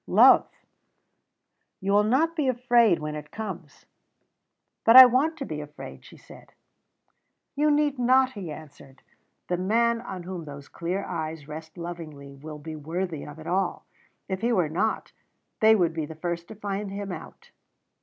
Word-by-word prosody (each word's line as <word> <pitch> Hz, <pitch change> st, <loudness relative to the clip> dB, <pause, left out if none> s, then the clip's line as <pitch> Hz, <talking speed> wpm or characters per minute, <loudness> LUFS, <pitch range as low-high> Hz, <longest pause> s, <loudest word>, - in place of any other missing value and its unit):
"Love." -, -, +6 dB, 1.3 s
"You 195 Hz, +1 st, -2 dB
will 205 Hz, +1 st, +5 dB
not 290 Hz, +10 st, +1 dB
be 300 Hz, -5 st, 0 dB
afraid 240 Hz, -3 st, +3 dB
of -, -, +1 dB
it -, -, -11 dB
when 150 Hz, 0 st, -4 dB
it 150 Hz, -1 st, -8 dB
comes." 185 Hz, -8 st, -8 dB, 1.0 s
"But 230 Hz, -, +6 dB
I 260 Hz, 0 st, +13 dB
want 270 Hz, +6 st, +1 dB
to 275 Hz, -, -5 dB
be 150 Hz, -7 st, -5 dB
afraid," 150 Hz, 0 st, -10 dB
she -, -, -15 dB
said. -, -, -16 dB, 1.0 s
"You 300 Hz, +2 st, +2 dB
need 290 Hz, -2 st, +1 dB
not," 255 Hz, +1 st, +4 dB
he 195 Hz, -9 st, -7 dB
answered. 145 Hz, -3 st, -13 dB, 0.4 s
"The 180 Hz, -, -1 dB
man 230 Hz, +5 st, +1 dB
on 190 Hz, -6 st, -7 dB
whom 175 Hz, -2 st, -6 dB
those 140 Hz, -1 st, -10 dB
clear 180 Hz, +4 st, -3 dB
eyes 160 Hz, -3 st, -5 dB
rest 160 Hz, +1 st, -9 dB
lovingly 160 Hz, -5 st, -8 dB
will 150 Hz, +2 st, -9 dB
be 155 Hz, +1 st, -8 dB
worthy 165 Hz, +1 st, -4 dB
of 145 Hz, 0 st, -10 dB
it 155 Hz, -, -11 dB
all. 185 Hz, +1 st, -1 dB, 0.4 s
If 190 Hz, -1 st, -4 dB
he 235 Hz, +2 st, +1 dB
were 180 Hz, -9 st, +1 dB
not, 215 Hz, +8 st, -1 dB, 0.5 s
they 220 Hz, 0 st, +6 dB
would 175 Hz, -5 st, +1 dB
be 160 Hz, -2 st, -3 dB
the 160 Hz, -, -9 dB
first 170 Hz, +1 st, -4 dB
to 220 Hz, -, -10 dB
find 205 Hz, 0 st, -4 dB
him 200 Hz, 0 st, -5 dB
out." -, -, -10 dB
180 Hz, 175 wpm, -26 LUFS, 155-230 Hz, 1.3 s, I